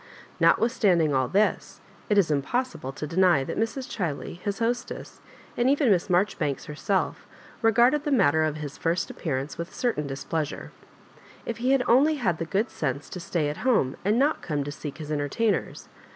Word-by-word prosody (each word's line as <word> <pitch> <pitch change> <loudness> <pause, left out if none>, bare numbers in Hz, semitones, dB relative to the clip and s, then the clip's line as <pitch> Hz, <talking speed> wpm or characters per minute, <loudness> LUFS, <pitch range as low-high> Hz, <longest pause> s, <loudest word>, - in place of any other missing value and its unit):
Not - - +5
withstanding 190 - +2
all 130 -1 +2
this, 205 +7 0 0.3
it 210 - +3
is 185 -6 +4
impossible 150 - -1
to 145 - -6
deny 170 -2 +3
that - - -5
Mrs. 240 +4 -2
Chiley, 170 -2 -4
his 200 +1 -3
hostess, 240 +1 -3 0.3
and 240 +2 +2
even 280 -4 +3
Miss 180 -1 +2
Maijoribanks 175 -6 0
herself 185 +6 -2 0.3
regarded 240 +6 +4
the 300 - -2
matter 160 - +3
of 155 -1 0
his 150 -2 -7
first 170 +1 -1
appearance 140 -1 -4
with 170 +1 -4
a - - -17
certain 225 - -1
displeasure. 145 +2 -4 0.7
If 230 - -4
he 245 +2 -1
had 270 -2 +3
only 280 +6 +5
had 195 - -1
the 165 - -2
good 200 +7 -1
sense 140 -1 -3
to 180 - -6
stay 170 -3 -1
at 150 - -3
home, 220 - +1
and 210 +4 +2
not 285 +4 +2
come 150 -4 -2
to 145 - -5
seek 145 0 -7
his 155 -2 -7
entertainers! 150 +9 -1
180 Hz, 180 wpm, -26 LUFS, 150-235 Hz, 0.7 s, Not